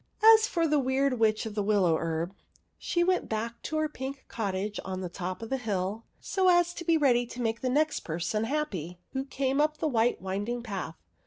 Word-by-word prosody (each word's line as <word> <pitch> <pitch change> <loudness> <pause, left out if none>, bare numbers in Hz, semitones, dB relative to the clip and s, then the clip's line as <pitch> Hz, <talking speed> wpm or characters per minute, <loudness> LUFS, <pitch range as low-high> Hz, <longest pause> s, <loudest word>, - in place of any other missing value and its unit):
As 440 0 +5
for 335 -2 +1
the 300 -1 +3
Weird 265 -1 +1
Witch 220 0 +2
of 220 - -5
the 210 - -1
WillowHerb, 170 -4 +1 0.5
she 345 -2 +1
went 365 +1 +1
back 225 +2 -3
to 315 - -3
her 310 0 +1
pink 270 -2 -7
cottage 205 -1 -3
on 185 -1 -4
the 180 - -4
top 185 +3 -5
of 225 - -8
the 265 - +1
hill, 210 -2 -2
so 380 -2 +1
as 350 -1 +4
to 340 - -6
be 330 -1 +3
ready 245 -5 +3
to 240 - -9
make 230 -1 -1
the 255 - 0
next 305 +4 +2
person 175 +7 -2
happy 210 - -3 0.2
who 265 0 -1
came 270 +1 0
up 305 0 +1
the 315 - 0
white 240 -3 +2
winding 205 +6 -3
path. 195 -7 -5
235 Hz, 210 wpm, -29 LUFS, 195-290 Hz, 0.5 s, As